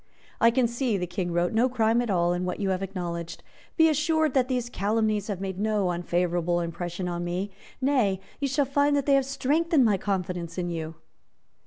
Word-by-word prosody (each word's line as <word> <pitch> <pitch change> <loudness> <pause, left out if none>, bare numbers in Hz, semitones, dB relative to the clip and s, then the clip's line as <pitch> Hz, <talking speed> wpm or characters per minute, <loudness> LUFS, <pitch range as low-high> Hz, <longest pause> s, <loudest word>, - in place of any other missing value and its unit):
"I 230 - +6
can 240 +1 +2
see," 235 -2 -1
the 180 - -2
King 175 0 -3
wrote, 175 +2 0
"no 235 +4 +3
crime 230 -1 +2
at 240 - -3
all 175 -2 +2
in 175 +1 -2
what 180 0 -3
you 200 -2 0
have 185 0 -1
acknowledged. 175 -3 -5 0.3
Be 320 -1 +6
assured 315 -1 +2
that 255 -2 +2
these 250 -2 -1
calumnies 215 -1 0
have 200 -4 -3
made 190 -1 -4
no 210 -3 +1
unfavourable 175 0 0
impression 175 +1 -4
on 175 0 -3
me. 180 +3 -3 0.3
Nay, 250 -9 +2 0.2
you 285 - 0
shall 275 +2 +1
find 285 +2 +2
that 280 -2 0
they 280 - +3
have 275 -1 +4
strengthened 285 +2 +2
my 210 -3 +3
confidence 180 -3 -3
in 175 -1 -2
you." 160 -1 -5
200 Hz, 200 wpm, -26 LUFS, 175-255 Hz, 0.3 s, I